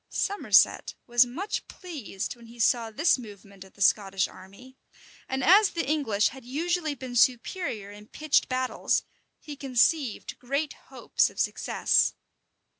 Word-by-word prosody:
Somerset 405 +1 +2
was 240 0 +4
much 370 +12 -4
pleased 280 - -7
when 235 -1 -16
he 235 +1 -15
saw 230 0 +2
this 275 +6 +2
movement 200 -4 -12
of 190 - -18
the 200 - -2
Scottish 195 -1 +2
army; 200 +8 -15 0.5
and 265 0 -2
as 390 +7 +6
the 330 -5 -3
English 265 -9 +1
had 265 -2 -12
usually 315 +4 -2
been 255 -2 -8
superior 240 - 0
in 210 +1 -13
pitched 305 +2 0
battles, 255 0 0 0.4
he 300 -2 -9
conceived 270 -1 0
great 280 +4 -2 0.2
hopes - - 0
of - - -13
success. - - +1
255 Hz, 140 wpm, -27 LUFS, 215-305 Hz, 0.5 s, as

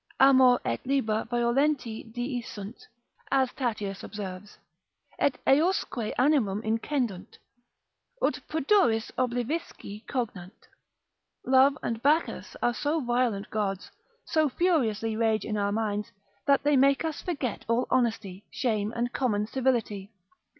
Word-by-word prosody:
Amor 260 -2 +6
et 115 - -2
Liber 225 -5 0
violenti 240 -1 0
dii 245 +1 -3
sunt) 210 +1 -9 0.4
as 265 -2 +2
Tatius 210 -6 -3
observes, 200 -1 -7 0.6
et 280 - +2
eousque 275 - +2
animum 250 -7 +2
incendunt, 225 -3 -2 0.8
ut 255 - +1
pudoris 300 - +2
oblivisci 245 -3 -3
cogant, 210 -8 -5 0.8
love 265 +2 +5
and 230 -1 -2
Bacchus 300 +5 +1
are 240 - +3
so 295 +5 0
violent 240 -6 0
gods, 200 -3 -2 0.3
so 310 -2 +2
furiously 230 - +1
rage 220 -1 +1
in 215 - -2
our 200 -1 0
minds, 210 -1 -2 0.4
that 280 -1 +4
they 295 0 +3
make 275 +3 +4
us 315 -2 -3
forget 285 - -3
all 230 +2 +1
honesty, 220 -6 0
shame, 215 -4 -1
and 240 +1 -2
common 210 -6 0
civility. 225 -5 -1
240 Hz, 120 wpm, -28 LUFS, 215-270 Hz, 0.8 s, Amor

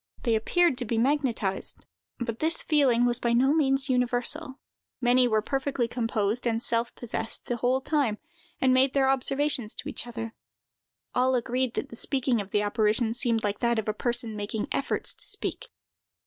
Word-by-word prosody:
They 235 - +2
appeared 280 +6 +2
to 245 - -2
be 230 +1 -1
magnetized; 235 -6 0 0.3
but 235 -2 -4
this 320 +2 +1
feeling 265 -6 +3
was 240 0 +1
by 235 -1 0
no 265 +4 +4
means 270 -3 +2
universal. 255 +3 0 0.4
Many 250 0 +4
were 215 -2 +1
perfectly 270 -2 -1
composed 230 -1 -1
and 225 -1 +1
self 235 0 0
possessed 225 -1 -3
the 240 - -2
whole 250 +3 +1
time, 275 -7 0 0.4
and 260 -1 +3
made 260 +1 +3
their 270 -1 +4
observations 270 -3 0
to - - -6
each 275 - -4
other. 230 -1 -6 0.8
All 255 +1 +2
agreed 250 +1 -1
that 275 - -3
the 235 - -9
speaking 255 -2 0
of 200 - -9
the 205 +1 +1
apparition 215 +2 +2
seemed 235 -2 0
like 205 -1 -1
that 235 -1 +1
of 220 - -2
a 215 - 0
person 235 0 -1
making 210 +1 -3
efforts 275 - 0
to - - -8
speak. - - -3
245 Hz, 175 wpm, -27 LUFS, 225-270 Hz, 0.8 s, no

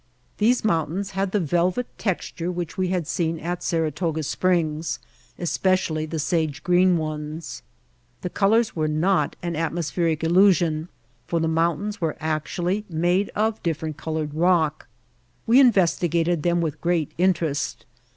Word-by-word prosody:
These 230 +2 +3
mountains 185 +1 0
had 195 0 -1
the 210 - +1
velvet 175 - +1
tex 190 -5 -2
ture 170 +1 -4
which 175 -2 -4
we 185 -1 0
had 180 -2 -1
seen 165 -1 -1
at 175 +2 -4
Saratoga 160 -1 -1
Springs, 165 -1 0 0.4
especially 175 -3 0
the 160 - -4
sage 155 -1 -1
green 180 0 +4
ones. 155 0 -5 0.6
The 180 - -4
colors 220 +3 +2
were 155 -2 0
not 155 0 +1
an 170 -1 -2
atmospheric 165 0 -1
illusion 170 -2 +3 0.4
for 170 - 0
the 160 - +1
mountains 170 +5 0
were 160 -2 -1
actually 170 +5 -1
made 175 +4 +1
of 220 +1 0
different 160 -2 -3
colored 155 -2 -3
rock. 165 -2 +1 0.6
We 240 +4 +6
investigated 175 - +3
them 175 +1 +1
with 155 -2 -3
great 170 -3 0
interest. 170 -5 0
170 Hz, 140 wpm, -24 LUFS, 160-185 Hz, 0.6 s, We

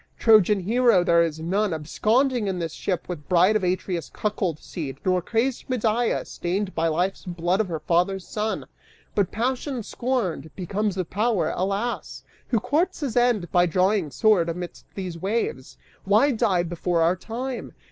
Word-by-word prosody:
Trojan 210 -3 +5
hero 230 -1 +3
there 170 -1 +4
is 160 -2 -1
none 190 +3 0
Absconding 225 - +1
in 190 -2 -1
this 165 -3 -3
ship 180 -3 -3
with 165 -5 -7
bride 185 +4 +4
of 215 - +1
Atreus' 180 -1 -1
cuckold 195 -6 -2
seed 145 -5 -6
Nor 185 -1 +2
crazed 235 +9 -1
Medea, 235 -1 +1
stained 190 +3 -3
by 165 0 +1
life's 180 +4 -1
blood 175 +1 -1
of 215 - -2
her 160 -3 -4
father's 180 +4 +1
son! 215 0 -2 0.5
But 200 -4 +1
passion 255 +2 -2
scorned, 200 - -2
becomes 195 +2 -2
a 185 - -1
power: 210 +2 0
alas! 200 +6 -2 0.2
who 235 - +1
courts 305 - 0
his 270 -6 -2
end 240 -7 +2
By 180 -1 +4
drawing 185 0 +2
sword 175 - +3
amidst 175 +1 -6
these 180 -4 -5
waves? 195 - -2 0.3
Why 215 +9 +4
die 215 -7 +2
before 170 0 0
our 170 +2 +3
time? 240 +6 -5
195 Hz, 160 wpm, -24 LUFS, 175-225 Hz, 0.5 s, Trojan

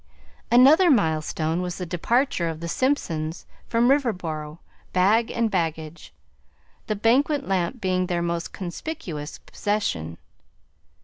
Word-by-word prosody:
Another 280 +9 +7
milestone 160 - +1
was 180 -1 -4
the 180 - -4
departure 180 - 0
of 160 -1 -5
the 170 - -5
Simpsons 165 - -1 0.2
from 235 +1 +2
Riverboro, 175 - -1 0.4
bag 210 +5 +3
and 230 -2 0
baggage, 165 -3 -3 0.8
the 215 - -1
banquet 275 +7 +2
lamp 190 +5 -1
being 185 -2 0
their 175 -1 -1
most 170 0 -2
conspicuous 175 - -6
possession. 85 - -3
185 Hz, 115 wpm, -24 LUFS, 165-235 Hz, 0.8 s, Another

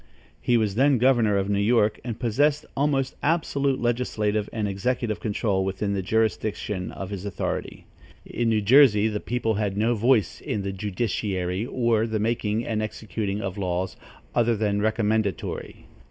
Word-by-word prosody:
He 120 - +3
was 110 -3 +1
then 135 +4 +4
governor 120 -4 +3
of 95 0 0
New 100 0 +1
York 105 0 +2
and 115 -2 -5
possessed 145 +5 +1
almost 135 -2 0
absolute 140 -4 +1
legislative 110 -3 0
and 110 -2 -2
executive 110 +3 -1
control 105 -3 0
within 95 +2 -2
the 100 - -1
jurisdiction 105 -2 -1
of 95 0 -7
his 100 -2 -5
authority. 100 -3 -4 0.4
In 120 0 -1
New 110 -1 +2
Jersey 110 -2 +6
the 105 -1 -2
people 115 -1 -1
had 100 -2 -2
no 115 +3 +2
voice 115 -2 +2
in 100 - -2
the 100 - -2
judiciary 95 -1 -2
or 115 -3 +1
the 110 -1 -1
making 110 +1 -1
and 110 -2 -1
executing 105 -1 -3
of 95 0 -4
laws 90 0 -2 0.4
other 120 -1 +2
than 105 -1 0
recommendatory. 110 -3 -1
110 Hz, 155 wpm, -25 LUFS, 100-120 Hz, 0.4 s, Jersey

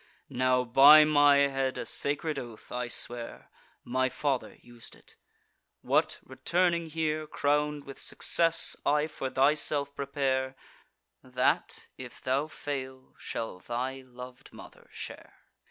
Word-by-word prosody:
Now 130 0 +2
by 140 +6 +8
my 145 -1 +5
head, 135 -2 +1
a - - -4
sacred 145 +1 -1
oath, 120 -4 -11
I 125 0 -3
swear, 120 0 -4 0.3
(My 130 +1 0
father 135 -1 -2
us'd 120 -1 -12
it,) - - -18 0.7
what, - - +1
returning 170 +6 0
here 155 -1 -2
Crown'd 150 0 0
with 135 -1 -11
success, 165 -1 +1
I 150 +1 +2
for 150 -4 -5
thyself 140 +1 +1
prepare, 135 -2 -1 0.7
That, 125 0 -1
if - - -10
thou 135 +4 -1
fail, 130 -4 -7
shall 110 -5 -5
thy 130 +5 -4
lov'd 125 +1 -12
mother - - -14
share." - - -10
135 Hz, 120 wpm, -29 LUFS, 130-150 Hz, 0.7 s, by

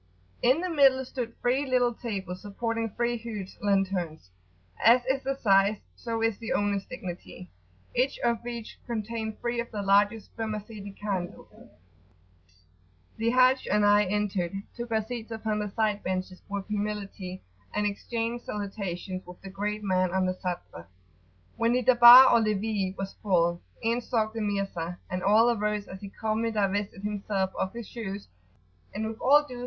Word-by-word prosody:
In 260 +7 +4
the 365 - -2
middle 270 -4 +5
stood 245 -3 -5
three 255 +3 +2
little 250 -3 +2
tables 195 -6 -5
supporting 225 +2 -2
three 240 +3 -1
huge 215 -4 -7
lanterns 190 - -1 0.5
as 245 +2 +6
is 265 +1 0
their 275 0 -2
size 200 -2 +4 0.2
so 230 -1 -3
is 225 -3 +1
the 230 - -3
owner's 200 -1 0
dignity 175 - -8 0.4
each 255 +3 +1
of 235 -1 +1
which 235 -2 -7
contained 220 -1 -4
three 235 0 -2
of 235 - -3
the 205 -2 -4
largest 205 +2 +2
spermaceti 215 -2 -5
candles. 195 -4 -4 1.7
The 225 +1 +1
Haji 255 +2 +4
and 210 0 +3
I 205 0 +5
entering 195 -1 -1
took 240 0 -5
our 220 -1 +2
seats 235 -1 -6
upon 220 -1 -2
the 210 0 -2
side 210 0 0
benches 185 0 -3
with 200 -1 -3
humility, 205 -3 -4 0.3
and 210 - 0
exchanged 230 +3 -3
salutations 195 -3 -4
with 180 0 -11
the 195 - -8
great 210 +2 -3
man 185 -2 +2
on 190 -1 +2
the 185 - 0
Sadr. 175 - -6 0.7
When 230 +1 +2
the 250 0 +1
Darbar 245 +1 +10
or 235 - +6
levee 210 -2 -1
was 195 0 -4
full, 175 -3 +2 0.2
in 230 +2 +1
stalked 220 -3 -1
the 225 - -3
Mirza, 195 -4 -2
and 185 0 -2
all 220 +5 +5
arose 210 -2 -1
as 190 - -9
he 200 - -7
calmly 220 +2 -1
divested 205 -2 -1
himself 200 -2 -1
of 190 - -2
his 235 -2 -7
shoes; 205 -4 -6 0.7
and 215 +2 -2
with 220 +1 -6
all 290 +3 +6
due 250 -2 -8
[p. - - -7
210 Hz, 165 wpm, -28 LUFS, 195-235 Hz, 1.7 s, Darbar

